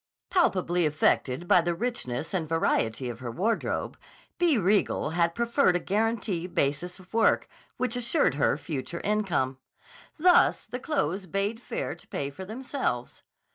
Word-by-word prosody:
Palpably 180 - +2
affected 150 0 +1
by 175 - +6
the 170 0 -1
richness 165 - -3
and 165 -5 -1
variety 130 -6 +1
of 120 -1 -6
her 125 -2 -5
wardrobe, 200 - -1 0.4
B. 340 -6 +4
Riegel 195 -5 +2
had 170 0 +1
proffered 235 -4 +2
a - - +2
guarantee 205 -2 -1
basis 175 +2 -1
of 185 +1 -18
work 225 0 +3 0.3
which 255 -1 -1
assured 245 - +2
her 140 0 +2
future 160 +1 -5
income. 180 -11 0 0.6
Thus 355 +2 +4
the 245 +3 -6
clothes 195 - -1
bade 200 +6 -1
fair - - -3
to - - -15
pay 140 0 -3
for 190 +7 -8
themselves. 225 - -3
185 Hz, 145 wpm, -27 LUFS, 155-230 Hz, 0.6 s, by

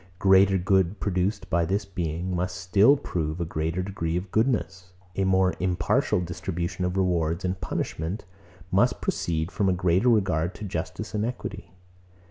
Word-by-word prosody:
Greater 95 0 +5
good 95 +1 +1
produced 100 +1 -1
by 85 0 +3
this 95 +5 -1
Being 90 -1 -3
must 90 +1 -2
still 100 +10 +4
prove 80 - -3
a 85 - -1
greater 80 +3 -2
degree 85 -3 -2
of 90 +1 -5
goodness: 95 -6 0 0.2
a 95 - +1
more 95 -1 +3
impartial 90 -3 +1
distribution 85 +1 -3
of 90 +1 -2
rewards 85 -2 0
and 90 0 -2
punishments 85 +3 -3 0.5
must 120 +7 +3
proceed 80 +1 -2
from 100 -2 +1
a - - +3
greater 90 +5 +2
regard 95 -6 +1
to 105 - -7
justice 95 +5 -5
and 105 -1 0
equity. 115 -6 -5
90 Hz, 155 wpm, -26 LUFS, 85-95 Hz, 0.5 s, Greater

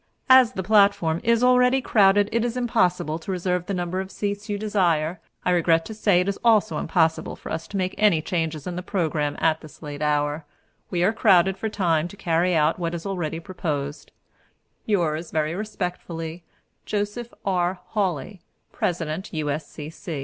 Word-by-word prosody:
As 255 -2 +7
the 190 - -3
platform 200 -5 +3
is 230 +1 +3
already 250 +1 +5
crowded, 205 -4 +4
it 230 0 +1
is 240 0 -2
impossible 180 -10 +1
to 180 - -6
reserve 180 -1 -1
the 200 - -2
number 175 +1 -2
of 190 0 -4
seats 205 +1 -4
you 205 - -1
desire. 180 -6 0 0.3
I 180 - +3
regret 165 -2 +3
to 220 - -7
say 205 -4 +3
it 180 - -2
is 200 - -2
also 220 -2 +3
impossible 160 -2 0
for - - -9
us 160 - -4
to 200 - -5
make 185 0 -1
any 210 -6 +4
change 160 -1 -2
in 180 - -4
the 180 - -3
programme 160 -6 -1
at 160 -1 +2
this 155 +1 -14
late 145 -1 -7
hour. 150 +1 0 0.5
We 175 -2 0
are 205 +5 +3
crowded 190 -4 +4
for 220 +3 -3
time 170 -6 +1
to 200 - -13
carry 175 0 +1
out 155 +2 +2
what 170 -1 -2
is 165 - -7
already 175 -5 -3
proposed. 150 -5 -4 0.8
"Yours 170 -6 0
Very 155 0 -1
Respectfully, 175 -4 -5 0.4
"Joseph 210 +3 -3
R. 180 -1 0
Hawley, 190 -3 -2 0.3
"President, 170 +1 -3
U. 150 -2 0
180 Hz, 170 wpm, -24 LUFS, 160-205 Hz, 0.8 s, As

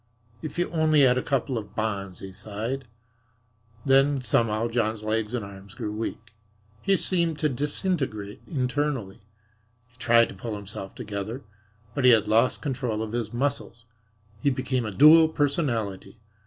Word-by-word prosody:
"If 155 -1 -6
you 175 - +1
only 155 -2 +3
had 125 -2 +5
a - - -2
couple 135 -3 -1
of 105 -1 -12
bonds," 100 -4 -3
he 95 - -7
sighed. 110 +7 -5 1.0
Then 135 +1 +4
somehow 115 -2 +1
John's 110 -2 -1
legs 110 +1 -1
and 115 -4 -3
arms 100 0 -12
grew 105 - -4
weak. 115 +1 -5 0.5
He 195 0 +3
seemed 170 -4 +1
to 150 -1 +1
disintegrate 135 - -2
internally. 130 - -2 0.7
He 125 - -30
tried 115 -1 +4
to - - -8
pull 105 +3 -5
himself 100 -1 -6
together, 110 +2 -5 0.5
but 140 - -2
he 125 - +7
had 110 -3 +5
lost 115 +4 +2
control 125 -6 -2
of 110 - -5
his 115 -2 -3
muscles. 120 -2 -3 0.6
He 140 - +3
became 130 -2 -1
a - - -4
dual 155 +7 +7
personality. 135 - -1
120 Hz, 155 wpm, -26 LUFS, 105-140 Hz, 1.0 s, he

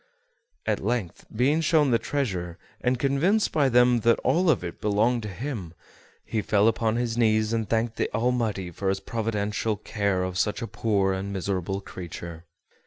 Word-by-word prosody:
At - - -1
length, 115 -9 -2
being 140 +8 +2
shown 155 -3 +3
the 115 - +3
treasure, 90 -12 -2 0.3
and 125 0 +2
convinced 145 - +2
by 145 -4 +3
them 125 0 +5
that 115 +1 +3
all 180 +1 +2
of 140 - +2
it 85 - -7
belonged 110 +4 +2
to 105 - -5
him, 100 - -5 0.5
he 110 - -1
fell 105 0 +3
upon 115 0 +1
his 120 -1 -1
knees 110 -1 +2
and 110 -2 -1
thanked 115 0 0
the - - -1
Almighty 115 -5 0
for 95 +3 -2
his 95 0 0
providential 105 0 -2
care 100 -3 -1
of 90 0 -3
such 105 +3 0
a - - -3
poor 100 -5 +1
and 95 +1 -4
miserable 95 0 -2
creature. 85 -3 -8
110 Hz, 175 wpm, -26 LUFS, 95-125 Hz, 0.5 s, them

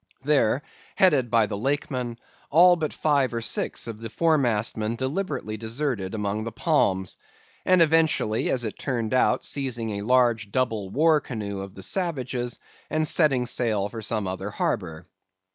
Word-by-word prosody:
There, 140 -2 +2 0.3
headed 145 -10 +3
by 115 -2 +4
the 105 - -4
Lakeman, 130 -2 -2 0.3
all 175 +3 +6
but 155 -3 -2
five 140 -5 +1
or 115 - -2
six 115 - -2
of 115 -2 -7
the 115 - -6
foremastmen 115 -8 +1
deliberately 130 - -3
deserted 115 -3 -3
among 105 0 -2
the 115 - -5
palms; 100 - 0 0.5
eventually, 160 -10 +3
as 125 -2 +1
it 110 - -5
turned 120 -4 -2
out, 130 - +2
seizing 120 -5 -2
a - - -5
large 120 -2 +2
double 110 -6 -1
war 155 +6 +3
canoe 105 -5 -5
of 95 0 -8
the 95 - -8
savages, 130 - -2 0.3
and 155 0 0
setting 140 -7 +4
sail 110 -5 0
for 115 0 -7
some 105 -2 -1
other 95 +2 -4
harbor. 90 -6 -3
120 Hz, 150 wpm, -25 LUFS, 110-145 Hz, 0.5 s, all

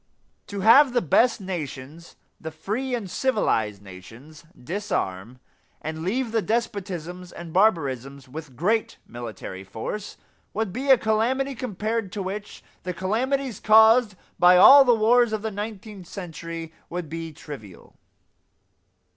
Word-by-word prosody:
To 200 -1 -5
have 250 +6 +6
the 245 - +2
best 230 - +3
nations, 165 -4 -7 0.2
the 160 - -6
free 215 - -3
and 225 -5 -5
civilized 110 - 0
nations, 115 - -13
disarm 125 - -4 0.4
and 160 +1 -6
leave 225 +7 -1
the 225 -1 +1
despotisms 185 -6 -3
and 170 -2 -9
barbarisms 140 - +1
with 145 -1 -9
great 215 - 0
military 110 -5 -8
force, 115 - -6 0.4
would 215 -3 -2
be 265 +5 -4
a 265 - +8
calamity 240 +6 0
compared 220 -3 -3
to 200 - -3
which 200 +2 -7 0.2
the 180 -1 -5
calamities 245 +6 -1
caused 220 0 +5 0.2
by 180 +1 +7
all 275 +9 +10
the 245 -3 +4
wars 230 +1 +3
of 215 -1 -3
the 220 - -2
nineteenth 205 -2 -7
century 165 -3 -7 0.2
would 175 -1 -5
be 165 +1 -6
trivial. 140 - -11
190 Hz, 130 wpm, -24 LUFS, 155-225 Hz, 0.4 s, all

